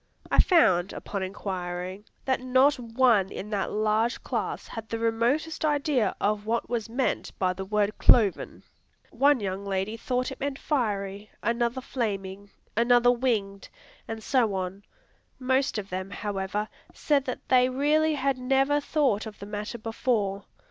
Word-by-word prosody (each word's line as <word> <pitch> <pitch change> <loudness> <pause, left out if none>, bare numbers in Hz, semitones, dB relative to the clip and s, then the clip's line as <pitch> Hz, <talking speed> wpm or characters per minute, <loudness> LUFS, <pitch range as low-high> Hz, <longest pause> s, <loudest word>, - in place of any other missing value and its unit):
I - - +3
found, 190 - +4
upon 200 -1 -5
inquiring, 185 0 -5 0.2
that 260 -1 +1
not 255 +2 +3
one 230 -4 +3
in 210 +3 -7
that 200 -2 -1
large 215 +3 0
class - - -3
had 225 -2 -7
the 230 - -2
remotest 235 +9 0
idea 290 - +1
of 210 +1 0
what 235 +1 0
was 230 -3 -3
meant 250 +3 -2
by 185 -1 +1
the 190 +1 -6
word 210 +1 0
"cloven." 210 -6 +3 0.5
One 285 -1 +4
young 195 -1 -3
lady 200 +2 -2
thought 250 +2 -2
it - - -8
meant 280 -1 -2
"fiery," 205 -8 -2
another 235 +2 0
"flaming," 200 -6 -4 0.3
another 245 +1 +5
"winged," 220 -6 -1 0.4
and 225 -1 -6
so 230 -6 +2
on. 190 +1 -4 0.6
Most 260 0 +1
of 200 -2 -5
them, 185 +1 -4
however, 205 +1 -3 0.3
said 285 -3 +1
that 255 - -5
they 255 0 +5
really 300 +4 +2
had 275 -2 0
never 270 +3 +2
thought 275 -8 0
of 215 - -9
the 200 - -8
matter 210 +3 -5
before. 215 -3 -1
225 Hz, 150 wpm, -27 LUFS, 200-255 Hz, 0.6 s, another